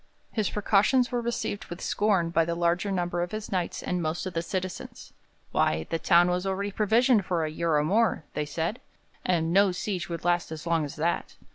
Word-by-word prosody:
His 215 Hz, -4 st, 0 dB
precautions 215 Hz, +5 st, +3 dB
were 245 Hz, -1 st, 0 dB
received 235 Hz, -3 st, -3 dB
with 175 Hz, +1 st, -8 dB
scorn 195 Hz, -5 st, +1 dB
by 165 Hz, 0 st, +3 dB
the 170 Hz, +1 st, -2 dB
larger 175 Hz, +3 st, +1 dB
number 175 Hz, -2 st, -1 dB
of 175 Hz, -, -2 dB
his 215 Hz, 0 st, -5 dB
Knights 180 Hz, -3 st, -2 dB
and 180 Hz, -1 st, -1 dB
most 160 Hz, +3 st, -2 dB
of 185 Hz, -, -4 dB
the 165 Hz, -, 0 dB
citizens. 185 Hz, +1 st, -5 dB, 0.4 s
'Why, 80 Hz, +1 st, +1 dB
the 165 Hz, -, 0 dB
town 175 Hz, +2 st, +5 dB
was 180 Hz, 0 st, 0 dB
already 200 Hz, +1 st, -2 dB
provisioned 220 Hz, +2 st, +3 dB
for 175 Hz, -3 st, 0 dB
a 155 Hz, -, -3 dB
year 165 Hz, 0 st, 0 dB
or 150 Hz, -, +3 dB
more,' 215 Hz, +2 st, +2 dB
they 150 Hz, -1 st, -2 dB
said, 165 Hz, +9 st, -3 dB, 0.4 s
'and 170 Hz, -2 st, +1 dB
no 200 Hz, 0 st, +5 dB
siege 185 Hz, 0 st, -3 dB
would 170 Hz, 0 st, -5 dB
last 175 Hz, -1 st, +1 dB
as 160 Hz, +1 st, -7 dB
long 165 Hz, -2 st, +1 dB
as 145 Hz, -, -8 dB
that.' 165 Hz, +3 st, -1 dB
175 Hz, 210 wpm, -27 LUFS, 165-200 Hz, 0.4 s, town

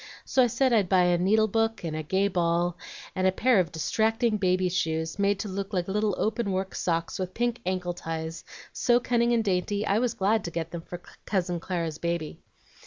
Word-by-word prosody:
So 265 Hz, -, +3 dB
I 245 Hz, -, +5 dB
said 260 Hz, +2 st, +1 dB
I'd 205 Hz, -6 st, +3 dB
buy 185 Hz, -2 st, +5 dB
a 175 Hz, -1 st, +3 dB
needle 215 Hz, +4 st, +3 dB
book, 225 Hz, 0 st, 0 dB
and 160 Hz, -2 st, -3 dB
a 155 Hz, -, -2 dB
gay 190 Hz, +6 st, +1 dB
ball, 175 Hz, -2 st, +1 dB, 0.4 s
and 185 Hz, 0 st, +2 dB
a -, -, +4 dB
pair 240 Hz, +3 st, +3 dB
of 175 Hz, -3 st, 0 dB
distracting 220 Hz, +6 st, +1 dB
baby's 185 Hz, -2 st, +1 dB
shoes, 160 Hz, +1 st, -1 dB
made 200 Hz, 0 st, +2 dB
to 215 Hz, -, -4 dB
look 195 Hz, +1 st, -5 dB
like 180 Hz, -2 st, 0 dB
little 210 Hz, 0 st, 0 dB
open 220 Hz, -1 st, -1 dB
work 190 Hz, 0 st, -2 dB
socks 165 Hz, 0 st, -2 dB
with 185 Hz, 0 st, -4 dB
pink 240 Hz, 0 st, -1 dB
ankle 180 Hz, -1 st, -1 dB
ties, 165 Hz, -1 st, -5 dB, 0.3 s
so 240 Hz, 0 st, +3 dB
cunning 240 Hz, -1 st, +1 dB
and 230 Hz, -1 st, +2 dB
dainty, 200 Hz, +1 st, 0 dB
I 200 Hz, +2 st, +2 dB
was 245 Hz, -2 st, 0 dB
glad 210 Hz, +3 st, +1 dB
to -, -, -2 dB
get 165 Hz, -1 st, -4 dB
them 170 Hz, -, -5 dB
for 175 Hz, +1 st, -9 dB, 0.2 s
Cousin 180 Hz, -3 st, 0 dB
Clara's 165 Hz, -3 st, -3 dB
baby. 170 Hz, -2 st, -3 dB
190 Hz, 210 wpm, -27 LUFS, 175-220 Hz, 0.4 s, I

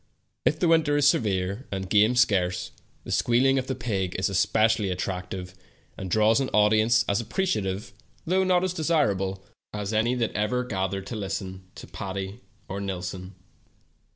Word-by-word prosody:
If 155 Hz, -, +3 dB
the 175 Hz, -, +2 dB
winter 160 Hz, -3 st, +3 dB
is 145 Hz, -2 st, +4 dB
severe, 100 Hz, -1 st, 0 dB
and 95 Hz, -1 st, -3 dB
game 105 Hz, +5 st, +4 dB
scarce, 90 Hz, -6 st, +1 dB, 0.3 s
the -, -, -7 dB
squealing 135 Hz, +3 st, +3 dB
of 130 Hz, -, -5 dB
the 130 Hz, -, -2 dB
pig 100 Hz, -7 st, -2 dB
is 95 Hz, +2 st, 0 dB
especi 110 Hz, +4 st, +3 dB
ally 105 Hz, -, -1 dB
attractive, 90 Hz, 0 st, -4 dB, 0.4 s
and 95 Hz, -, -6 dB
draws 110 Hz, +5 st, +4 dB
an 135 Hz, -, -1 dB
audience 110 Hz, +2 st, +4 dB
as 100 Hz, +2 st, +1 dB
appre 190 Hz, -, -2 dB
ciative, 95 Hz, -, -2 dB, 0.3 s
though 185 Hz, +3 st, +2 dB
not 180 Hz, -1 st, +3 dB
as 185 Hz, -1 st, 0 dB
desirable, 100 Hz, -, 0 dB, 0.3 s
as 105 Hz, 0 st, -3 dB
any 115 Hz, +3 st, +2 dB
that 115 Hz, -3 st, -1 dB
ever 105 Hz, +4 st, 0 dB
gathered 95 Hz, -4 st, -3 dB
to 115 Hz, -, -6 dB
listen 95 Hz, -2 st, -5 dB
to -, -, -9 dB
Patti 95 Hz, +2 st, -6 dB, 0.3 s
or 100 Hz, +1 st, -5 dB
Nillson. 95 Hz, -1 st, -5 dB
105 Hz, 165 wpm, -26 LUFS, 95-125 Hz, 0.4 s, is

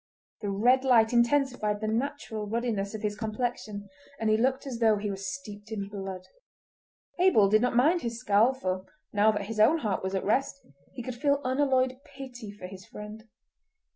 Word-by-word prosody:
The 205 Hz, -, -2 dB
red 245 Hz, +7 st, +3 dB
light 235 Hz, -3 st, +4 dB
intensified 235 Hz, -4 st, +2 dB
the 215 Hz, -, -3 dB
natural 225 Hz, -2 st, -3 dB
ruddiness 220 Hz, -2 st, -2 dB
of 215 Hz, -, -7 dB
his 210 Hz, -1 st, -1 dB
complexion, 215 Hz, -1 st, -4 dB, 0.3 s
and 220 Hz, -1 st, +1 dB
he -, -, +5 dB
looked 260 Hz, +5 st, +1 dB
as 250 Hz, -4 st, -5 dB
though 220 Hz, -2 st, +4 dB
he 205 Hz, 0 st, -3 dB
were -, -, -3 dB
steeped 195 Hz, +2 st, -7 dB
in 200 Hz, -2 st, -4 dB
blood. 195 Hz, -2 st, -6 dB, 1.0 s
Abel 350 Hz, -, +5 dB
did 215 Hz, +1 st, +4 dB
not 250 Hz, 0 st, +1 dB
mind 315 Hz, +8 st, +4 dB
his 235 Hz, -3 st, -4 dB
scowl, 230 Hz, +2 st, +3 dB
for 185 Hz, -6 st, -3 dB, 0.3 s
now 210 Hz, +1 st, +4 dB
that 205 Hz, -2 st, -3 dB
his 220 Hz, +1 st, -5 dB
own 255 Hz, +10 st, +6 dB
heart 215 Hz, -, -2 dB
was 190 Hz, +1 st, -3 dB
at 190 Hz, -, -2 dB
rest 270 Hz, +6 st, 0 dB, 0.3 s
he 245 Hz, -, -6 dB
could 255 Hz, -, -4 dB
feel 280 Hz, +3 st, +1 dB
unalloyed 260 Hz, -1 st, +1 dB
pity 265 Hz, -6 st, -10 dB
for 205 Hz, -2 st, -10 dB
his 185 Hz, 0 st, -9 dB
friend. 210 Hz, +3 st, -10 dB
220 Hz, 185 wpm, -28 LUFS, 205-255 Hz, 1.0 s, own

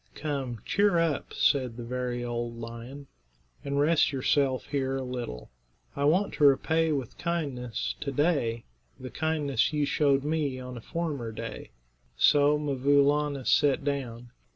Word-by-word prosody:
"Come, 135 Hz, -7 st, -4 dB
cheer 200 Hz, -3 st, +2 dB
up," 165 Hz, -4 st, 0 dB
said 130 Hz, -5 st, +1 dB
the 120 Hz, -, -6 dB
very 125 Hz, 0 st, -3 dB
old 120 Hz, -1 st, -4 dB
lion, 115 Hz, +4 st, -8 dB, 0.6 s
"and 140 Hz, 0 st, -1 dB
rest 155 Hz, +2 st, +3 dB
yourself 135 Hz, -1 st, +1 dB
here 135 Hz, -2 st, -1 dB
a 135 Hz, -, -3 dB
little. 120 Hz, -, -6 dB, 0.4 s
I 140 Hz, -, 0 dB
want 180 Hz, +7 st, +2 dB
to 150 Hz, -, -1 dB
repay 160 Hz, +3 st, +4 dB
with 135 Hz, -6 st, -3 dB
kindness 140 Hz, -9 st, -2 dB
to 140 Hz, -, -3 dB
day 135 Hz, -6 st, 0 dB, 0.4 s
the 130 Hz, -, -8 dB
kindness 150 Hz, -6 st, 0 dB
you 150 Hz, -1 st, +1 dB
showed 140 Hz, -2 st, +2 dB
me 150 Hz, -4 st, -1 dB
on 125 Hz, 0 st, -7 dB
a 120 Hz, -, -8 dB
former 145 Hz, -6 st, -3 dB
day." 110 Hz, -, -7 dB, 0.5 s
So 145 Hz, 0 st, +5 dB
'Mvoo 140 Hz, -1 st, +2 dB
Laana 145 Hz, -2 st, 0 dB
sat 145 Hz, -2 st, +3 dB
down. 125 Hz, -4 st, -4 dB
140 Hz, 150 wpm, -28 LUFS, 125-150 Hz, 0.6 s, So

